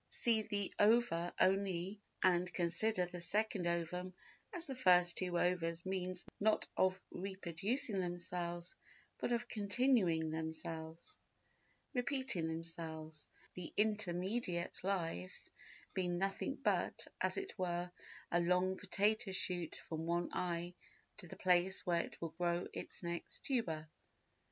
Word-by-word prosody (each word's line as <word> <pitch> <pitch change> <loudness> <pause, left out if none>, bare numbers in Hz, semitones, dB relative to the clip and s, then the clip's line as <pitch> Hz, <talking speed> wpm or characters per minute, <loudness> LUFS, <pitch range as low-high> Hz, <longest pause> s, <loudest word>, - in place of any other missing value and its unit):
See 230 -3 +3
the 205 -2 -2
ova 205 -6 +4
only 195 +1 +2 0.2
and 180 -1 +4
consider 180 +3 +2
the 175 0 -7
second 195 +1 +2
ovum 175 +2 -2 0.4
as 345 -1 +1
the 275 - -2
first 180 -7 +5
two 180 -2 0
ova's 170 -1 +1
means 185 -1 -2
not 215 +1 +3
of 185 0 +3
reproducing 195 - -1
themselves 175 0 -3 0.5
but - - -1
of 240 0 0
continuing 200 -7 +2
themselves—repeating 165 - -4
themselves—the 160 +1 -6
intermediate 190 -3 0
lives 165 - -2 0.4
being 180 -2 0
nothing 195 +8 -1
but, 275 - 0 0.2
as - - +1
it 390 0 -3
were, 175 -1 -1 0.4
a 175 - +4
long 180 +2 +2
potato 205 +1 +1
shoot 180 -3 -1
from 160 0 -3
one 175 +1 +1
eye 175 0 -1 0.4
to 190 - -9
the - - -8
place 180 +1 +3
where 170 -1 +3
it - - -9
will 165 - -3
grow 175 0 +1
its - - -6
next 170 0 -5
tuber. 165 - 0
180 Hz, 120 wpm, -37 LUFS, 170-200 Hz, 0.5 s, first